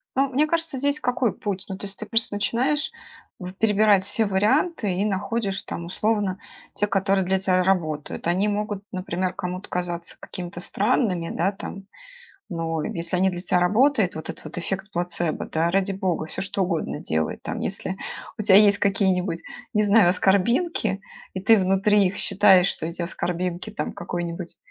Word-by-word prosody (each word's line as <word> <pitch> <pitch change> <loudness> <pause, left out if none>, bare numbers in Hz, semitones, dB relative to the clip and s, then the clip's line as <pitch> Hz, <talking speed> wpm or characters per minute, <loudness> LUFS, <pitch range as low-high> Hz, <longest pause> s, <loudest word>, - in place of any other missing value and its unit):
Ну, 270 +1 +2
мне 285 +4 +2
кажется, 325 -3 +4
здесь 285 +3 +1
какой 245 -2 0
путь? 195 -2 -4
Ну, 190 - -6
то 200 - -7
есть 195 - -10
ты 215 - -5
просто 225 -1 +3
начинаешь 255 +8 0 0.5
в 180 0 -7
перебирать 210 -1 +3
все 220 +2 +1
варианты 210 - +1
и 185 +3 0
находишь 205 0 -1
там, 170 - -6
условно, 205 0 -1 0.3
те, 210 - 0
которые 195 -1 +1
для 190 +1 +2
тя 185 -1 +2
работают. 160 -6 -1
Они 185 +4 +2
могут, 205 -1 -2
например, 185 0 -2
кому-то 180 +1 -5
казаться 175 -1 -3
какими-то 175 -1 -7
странными, 195 -5 0
да, 190 +3 +1
там, 195 0 -8 0.7
но 165 -4 -3
если 170 +2 -2
они 190 +1 +3
для 175 - -5
тя 180 0 +1
работают, 215 +2 +3
вот 160 - -6
этот - - -10
вот 155 - -8
эффект 195 +3 -4
плацебо, 175 -2 -2
да, 160 +1 0
ради 195 +1 +2
бога, 185 -5 -2
всё 185 - -4
что 200 0 -2
угодно 165 -4 -2
делай. 80 - -1
Там, - - -4
если 190 0 -2 0.4
у - - -1
тя 200 -2 +5
есть 205 0 +6
какие-нибудь, 190 -3 +1 0.4
не 210 - +3
знаю, 205 -3 +5
аскорбинки, 200 - +1 0.3
и 190 - -3
ты 220 +3 +5
внутри 195 +2 +3
их 185 - -2
считаешь, 195 -2 +5
что - - -1
эти 170 +2 -5
аскорбинки 180 +3 -3
там, 210 - -4
какой-нибудь 175 0 -5
195 Hz, 170 wpm, -24 LUFS, 180-210 Hz, 0.7 s, есть